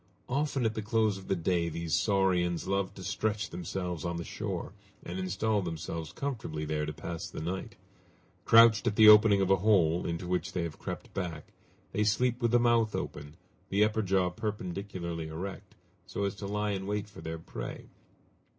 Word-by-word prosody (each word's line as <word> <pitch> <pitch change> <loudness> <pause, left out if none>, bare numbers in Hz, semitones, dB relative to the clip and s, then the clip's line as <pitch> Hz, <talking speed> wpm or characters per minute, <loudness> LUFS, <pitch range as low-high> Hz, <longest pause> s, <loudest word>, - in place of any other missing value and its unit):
Often 140 -1 0
at 110 - +1
the 110 - -3
close 105 -2 +1
of 95 - -13
the - - +1
day 85 -1 0
these 85 0 -4
saurians 90 -2 +2
love 100 0 0
to 95 - -9
stretch 105 +4 -1
themselves 90 -1 -4
on 85 -1 -2
the 85 - -4
shore, - - -4 0.3
and 90 +2 -4
install 100 +3 0
themselves 80 -2 -5
comfortably 105 - -4
there 75 0 -1
to - - -2
pass 80 +2 -6
the - - -7
night. 90 +4 -4 0.7
Crouched 115 0 +7
at 105 - +1
the 110 0 +7
opening 105 -1 +8
of 95 0 +2
a 95 - +6
hole, 90 -4 +3
into 85 +1 -3
which 90 0 -1
they 90 - -1
have 85 -2 -6
crept - - -6
back, 85 -5 -5 0.4
they 105 - +1
sleep 120 +4 +1
with 120 - +3
the 120 +1 +4
mouth 115 -2 +3
open, 75 +1 -5 0.3
the 100 +2 +3
upper 110 +1 +2
jaw 95 -2 +1
perpendicularly 90 -4 -4
erect, 95 +4 -7 0.3
so 100 - -3
as 100 -1 0
to 100 0 -7
lie 105 +1 -1
in 95 -1 -3
wait 105 0 -2
for 105 - -12
their 80 0 -5
prey. - - -7
95 Hz, 185 wpm, -30 LUFS, 85-105 Hz, 0.7 s, opening